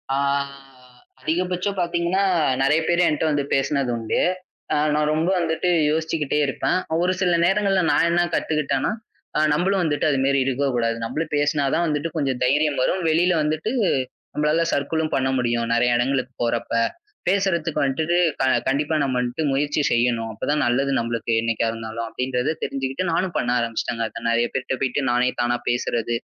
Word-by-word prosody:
ஆ - - 0 1.0
அதிகபட்சம் 180 +5 -1
பாத்தீங்கன்னா, 175 +2 0 0.4
நெறைய 150 +4 +3
பேர் 175 +1 +3
என்ட்ட 150 +1 -1
வந்து 145 -1 0
பேசினது 135 -1 +1
உண்டு. 110 -1 -1 0.5
அ, - - +2 0.2
நான் 150 0 +1
ரொம்ப 160 +4 +1
வந்துட்டு 165 +1 0 0.2
யோசிச்சுக்கிட்டே 155 -2 -1
இருப்பேன். 175 +6 0 0.3
ஒரு 185 +1 +2
சில 180 -2 +2
நேரங்கள்ல 195 0 +2
நான் - - +3
என்ன 175 +1 +2
கத்துக்கிட்டேன்னா, 150 +1 0 0.5
அ, - - +3
நம்மளும் 190 +4 +1
வந்துட்டு 150 -1 0
அது 135 -2 +1
மாதிரி 140 0 +2
இருக்கக் 135 0 0
கூடாது. 115 -1 0
நம்மளும் 150 +7 -3
பேசினாதான் 145 +3 +1
வந்துட்டு 150 +2 -1
கொஞ்சம் 135 -4 -1
தைரியம் 145 +2 +2
வரும். 185 +6 0
வெளியில 175 +3 +3
வந்துட்டு 155 +8 -1 0.6
நம்மளால 150 +2 +1
சர்க்கில்லும் 155 +3 -1
பண்ண 130 0 +1
முடியும், 120 -1 0
நெறைய 120 0 +3
இடங்களுக்குப் 130 0 -1
போறப்ப. 115 0 -2 0.5
பேசுறதுக்கு 180 -5 +1
வந்துட்டு 160 +6 0 0.5
கண்டிப்பா 150 +4 0
நம்ம 130 -2 -1
வந்துட்டு 125 +5 -2
முயற்சி 145 +2 0
செய்யணும். 120 -1 +1
அப்பதான் 145 +7 -1
நல்லது 135 +3 +1
நம்மளுக்கு 115 0 -2
என்னைக்கா 115 0 0
இருந்தாலும். 115 0 -5
அப்படின்றதை 125 +1 -1
தெரிஞ்சிக்கிட்டு 135 +6 -2
நானும் 180 +1 -1
பண்ண 120 - -1
ஆரம்பிச்சிட்டேங்க. 115 0 -2 0.2
நெறைய 115 +1 +2
பேர் 130 - -2
கிட்ட 130 - -2
போயிட்டு 135 +2 0
நானே 125 +1 +2
தானா 120 0 +1
பேசுறது, 120 -1 -1
145 Hz, 155 wpm, -22 LUFS, 125-165 Hz, 1.0 s, நெறைய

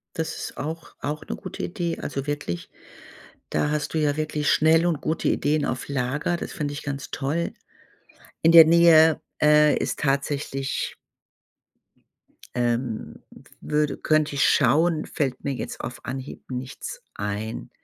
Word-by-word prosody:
Das 160 -1 -2
ist - - -6
auch 160 +3 -6
auch 150 +1 -3
'ne - - -3
gute - - -8
Idee. 170 -1 -3
Also 135 -2 -4
wirklich, 145 -13 -4 0.8
da 150 - 0
hast 150 -1 -2
du 160 - +1
ja 145 -2 +1
wirklich 155 -1 -1
schnell 160 +2 +4
und 170 -4 0
gute 160 - -1
Ideen 150 +1 +1
auf 130 - -3
Lager. 140 +5 -1
Das - - -6
fänd 145 -2 -3
ich 145 - -6
ganz 140 -2 -5
toll. 150 +5 -2 0.9
In 165 - +5
der 165 -1 +11
Nähe, 160 -1 +6 0.2
äh, 150 0 +6
ist - - -2
tatsächlich 140 -1 -1 1.6
ähm, 120 -1 -1 0.2
w - - -17
würde 150 -1 0
könnt 155 -1 +2
ich 140 0 +1
schauen, 155 +4 +3
fällt 135 -4 -2
mir 140 - -1
jetzt 125 - -5
auf 125 - -7
Anhieb 130 +1 -7
nichts 130 +1 -6
ein. 105 - -4
145 Hz, 150 wpm, -24 LUFS, 135-155 Hz, 1.6 s, der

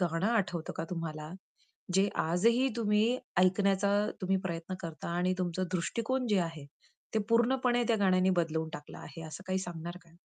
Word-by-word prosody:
गाणं 175 +1 +1
आठवतो 185 -8 0
का 165 - -2
तुम्हाला, 155 -3 -4 0.6
जे 195 +2 +4
आजही 230 +11 +3
तुम्ही 220 +2 +2 0.2
ऐकण्याचा 195 +2 +3 0.3
तुम्ही 190 +1 +2
प्रयत्न 170 0 -3
करता 165 -3 -6
आणि 180 +1 +2
तुमचा 180 0 -1
दृष्टिकोन 230 +8 -1
जे 205 - +3
आहे, 165 -4 -4 0.5
ते - - +4
पूर्णपणे 245 +1 +3
त्या 230 - +4
गाण्याने 185 -1 +4
बदलून 160 -2 0
टाकलं 150 - -9
आहे 160 +3 -9
असं 155 +4 -8
काही 190 0 0
सांगणार 175 -1 -6
का? 165 - -22
185 Hz, 160 wpm, -31 LUFS, 165-210 Hz, 0.6 s, जे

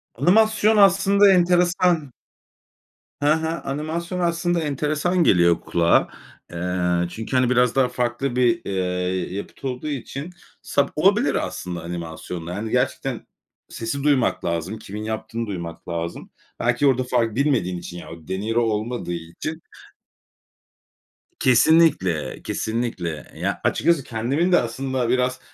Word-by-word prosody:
Animasyon 215 - +4
aslında 200 +1 +5
enteresan. 175 -4 +2 1.1
He - - 0
he. 160 +1 +2
Animasyon 165 +3 -3
aslında 170 0 0
enteresan 155 +4 0
geliyor 85 - +4
kulağa. 85 -1 +2 0.4
Eee, 90 0 0
çünkü, 115 +7 -5
hani, 125 -1 +3
biraz 125 -1 +3
daha 135 -2 +4
farklı 125 +1 -2
bir, 120 -2 +2
eee, 90 -1 -2
yapıt 100 - -8
olduğu 130 +3 -4
için 140 +3 -5 0.3
sa - - +1
olabilir - - +3
aslında 90 -2 -6
animasyonla. 85 0 -6
Hani, 110 +2 -4
gerçekten - - -1 0.4
sesi 125 +5 -4
duymak 140 -9 +2
lazım, 85 +5 -2
kimin 105 0 -7
yaptığını 110 +1 -4
duymak 85 -4 -6
lazım. 85 0 -4 0.3
Belki 120 +4 +2
orada 130 -1 +3
far 115 -3 0
bilmediğin 125 -11 +1
için, 90 0 -8
yani 85 - -9
o - - -22
deniro 110 +5 -1
olmadığı 110 -3 -2
için. 85 - -6 1.8
Kesinlikle, 130 - +3
kesinlikle. 105 - -3
Eee, - - -13
ya - - -2
açıkçası 170 -6 +2
kendimin 130 +10 -1
de 180 - +6
aslında 125 +1 -2
biraz 125 +1 +1
120 Hz, 125 wpm, -22 LUFS, 95-155 Hz, 1.8 s, de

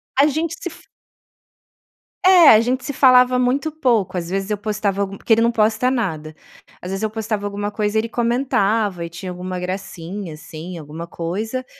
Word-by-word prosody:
a 280 +2 +5
gente 320 +3 -2
se 355 - -5
f - - -16 1.4
É, 360 -4 +8
a 215 - +8
gente 255 +2 -1
se 285 - -4
falava 255 -1 +5
muito 270 +5 0
pouco. 235 - 0
Às 170 -1 -4
vezes 195 +2 -2
eu 210 - -1
postava 205 -1 -2
algu 195 0 -3
porque 225 - +2
ele 225 - +3
não 235 +1 +3
posta 220 +2 +2
nada. 155 -11 -3 0.5
Às 180 - -6
vezes 195 +3 -3
eu 215 - 0
postava 215 -1 -3
alguma 205 0 -3
coisa, 210 0 -1
ele 225 +1 0
comentava 225 -6 0
e - - -7
tinha 180 +2 -7
alguma 180 0 -5
gracinha, 185 -1 -6
assim, 160 +3 -9
alguma 160 +2 -8
coisa. 215 +10 -4
210 Hz, 185 wpm, -20 LUFS, 185-245 Hz, 1.4 s, É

